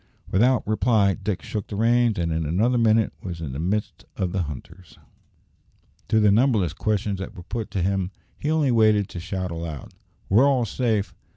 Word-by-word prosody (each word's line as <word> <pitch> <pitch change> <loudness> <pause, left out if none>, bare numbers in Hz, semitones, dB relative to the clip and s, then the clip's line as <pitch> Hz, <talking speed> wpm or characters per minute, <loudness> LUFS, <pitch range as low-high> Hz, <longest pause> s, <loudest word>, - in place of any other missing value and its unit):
Without 120 +5 +3
reply, 105 -1 +2
Dick 100 -2 -4
shook 105 -3 -4
the 105 - -6
reins, 115 +1 +2
and 85 -1 -1
in 80 0 -1
another 110 +11 +1
minute 110 -1 +3
was 85 -3 -6
in 80 -5 -5
the 65 - -5
midst 100 +6 -2
of 90 -2 -1
the 95 - -1
hunters. 85 +4 -9 1.1
To 110 +2 +3
the 105 -1 +5
numberless 110 -5 +2
questions 105 -2 -1
that 95 - -7
were 90 - -9
put 115 +3 -5
to 95 - -2
him 95 -1 0 0.3
he 150 - -2
only 155 -4 +2
waited 110 -3 +3
to 90 - -7
shout 95 +1 -4
aloud, 80 -4 -6 0.3
"We're 115 +8 +5
all 130 -4 +2
safe! 110 -2 -1
100 Hz, 185 wpm, -24 LUFS, 90-115 Hz, 1.1 s, the